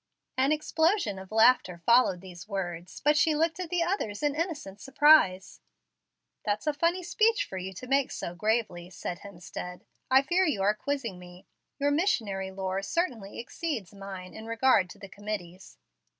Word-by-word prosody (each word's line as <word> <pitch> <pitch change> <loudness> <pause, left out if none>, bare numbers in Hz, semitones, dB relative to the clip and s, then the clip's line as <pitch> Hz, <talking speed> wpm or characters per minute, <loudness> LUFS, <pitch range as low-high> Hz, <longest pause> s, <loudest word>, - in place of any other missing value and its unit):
An 265 +3 +2
explosion 315 - +1
of 190 +1 -11
laughter 220 -5 +4
followed 235 -7 +4
these 185 0 -11
words, 180 -3 -5
but 295 +2 +4
she 315 0 +3
looked 325 +2 +1
at 360 -3 -4
the 355 -1 +1
others 320 - -2
in 290 -1 +2
innocent 295 - -4
surprise. 270 -10 +4 0.8
"That's 210 +5 -1
a 300 - +1
funny 340 +5 +1
speech 435 +5 +2
for 190 - -6
you 185 +1 -5
to 190 - -8
make 275 +1 +2
so 170 - -5
gravely," 210 -3 -1
said 180 -1 -5
Hemstead. 180 -2 -8 0.3
"I 265 +1 +6
fear 355 +6 +2
you 290 - 0
are 205 +2 +4
quizzing 230 -4 -3
me. 180 0 -13 0.3
Your 285 0 +1
missionary 220 - 0
lore 190 0 -3
certainly 225 - -2
exceeds 240 - -4
mine 195 -2 -8
in 220 0 -9
regard 230 -5 +3
to - - -11
the 200 -1 -10
'committees.' 195 -2 -7
220 Hz, 165 wpm, -28 LUFS, 190-300 Hz, 0.8 s, I